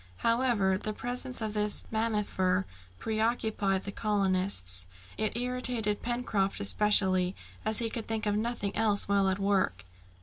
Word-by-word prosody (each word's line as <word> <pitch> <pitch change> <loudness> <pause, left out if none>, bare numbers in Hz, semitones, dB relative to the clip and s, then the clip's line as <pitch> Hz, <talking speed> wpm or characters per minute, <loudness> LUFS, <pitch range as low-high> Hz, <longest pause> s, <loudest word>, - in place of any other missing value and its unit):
However, 230 -6 +2
the 215 - -3
presence 250 +2 -2
of 215 -1 -2
this 210 -1 0
mammifer 210 -4 0 0.3
preoccupied 220 - 0
the 200 - -4
colonists. 185 - 0 0.3
It 215 +1 -2
irritated 245 -4 -1
Pencroft 235 -5 -1
especially 185 - +3 0.3
as 215 0 +2
he 230 - +1
could 230 -3 -4
think 220 -1 -2
of 205 -1 +1
nothing 215 -2 -2
else 210 -2 +2
while 200 -1 +3
at 190 - 0
work. 195 - 0
210 Hz, 135 wpm, -30 LUFS, 195-225 Hz, 0.3 s, especially